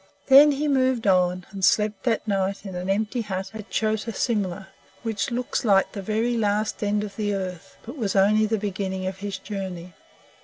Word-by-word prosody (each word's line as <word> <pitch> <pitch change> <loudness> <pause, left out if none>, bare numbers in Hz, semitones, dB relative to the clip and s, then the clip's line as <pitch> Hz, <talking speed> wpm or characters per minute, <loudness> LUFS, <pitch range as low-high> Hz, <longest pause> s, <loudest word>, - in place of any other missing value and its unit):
Then 285 +2 +8
he 295 +2 -1
moved 260 -4 +2
on, 180 -2 +2
and 195 -1 -7
slept 210 +3 +2
that 230 -2 0
night 195 0 -1
in 190 - -6
an 180 +1 -4
empty 220 +5 0
hut 190 -3 -4
at 215 -1 -9
Chota 220 +1 -1
Simla, 195 -5 -2 0.3
which 220 -4 -2
looks 245 +1 -2
like 195 -4 +3
the 200 - -6
very 220 +4 0
last 210 -1 0
end 205 0 0
of 205 -1 -7
the 205 -2 -1
earth, 185 -3 -6
but 235 - -7
it 300 - -12
was 205 -4 -1
only 210 +3 +4
the 220 +1 0
beginning 190 -2 -3
of 190 0 -3
his 200 -1 -4
journey. 190 -3 -6
205 Hz, 195 wpm, -24 LUFS, 190-220 Hz, 0.3 s, Then